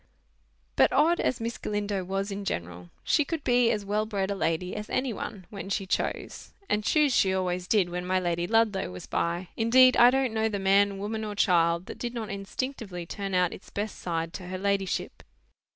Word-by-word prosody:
But 130 - +5
odd 320 +5 +3
as 255 - 0
Miss 230 +1 -4
Galindo 205 -2 -2
was 195 +2 -3
in 200 +1 -4
general, 85 - -5
she 300 - +3
could 315 +1 -4
be 245 -1 +3
as 210 -2 -1
well 210 +2 0
bred 200 -2 -1
a - - -1
lady 180 -1 -1
as 210 0 -6
any 255 -2 -1
one 200 -2 -6
when 195 -2 -7
she 195 0 -1
chose. 190 - -3
And 210 -7 0
choose 295 +2 +3
she 190 - +4
always 180 -1 -2
did 200 -2 +3
when 180 +1 -4
my 185 0 +2
Lady 175 -1 -1
Ludlow 225 -3 +2
was 90 0 -8
by. 170 +2 -2
Indeed, 255 +3 +6
I 240 - +8
don't 260 -2 +1
know 220 0 +1
the 205 - -2
man, 195 +1 +3
woman, 215 +2 -3
or 210 -1 -4
child, 170 -2 +3
that - - -9
did 240 0 -4
not 220 -3 -4
instinctively 200 -2 -5
turn 195 +2 -4
out 180 -1 +2
its - - -12
best 210 +1 -4
side 165 -1 -3
to 180 - -7
her 185 +1 -4
ladyship. 195 -1 -1
200 Hz, 205 wpm, -27 LUFS, 180-225 Hz, -, I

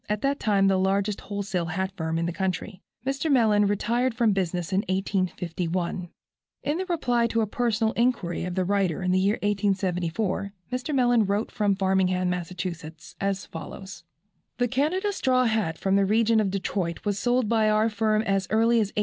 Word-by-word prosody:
at 210 0 -1
that 280 +1 +1
time 200 -2 +3
the 190 -1 +3
largest 195 +2 0
wholesale 200 -4 -3
hat 190 +3 -2
firm 160 -2 -2
in 165 - 0
the 170 - -1
country. 190 +2 -3 0.2
Mr. 275 +3 -1
Mellen 215 -5 +4
retired 235 +5 0
from 235 -3 +3
business 180 -2 -2
in 190 - +2
1851. 180 -2 -2 0.5
In 320 +7 -1
reply 245 -9 +1
to 230 0 0
a 220 - 0
personal 225 0 0
inquiry 230 -8 0
of 180 -1 -4
the 185 - +1
writer 190 -3 0
in 185 - +1
the 185 - +3
year 200 +3 +2
1874, 195 -1 -1 0.2
Mr. 255 +4 -3
Mellen 245 -4 +3
wrote 200 +3 -1
from 205 -3 +1
Framingham, 190 -1 +1
Mass., 180 -1 -3 0.7
as 195 -1 -1
follows: 190 +4 -9 0.5
"The 245 - +2
Canada 320 - 0
straw 255 -7 +2
hat 220 -8 0
from 195 0 +1
the 200 0 +4
region 220 +2 +3
of 210 -3 +1
Detroit 185 -2 -3
was 205 -1 0
sold 245 -1 +1
by 220 -1 +3
our 215 +1 +3
firm 215 0 +1
as 195 -2 0
early 230 +2 +3
as 215 -3 +2
1845. - - -17
200 Hz, 180 wpm, -26 LUFS, 185-230 Hz, 0.7 s, Mellen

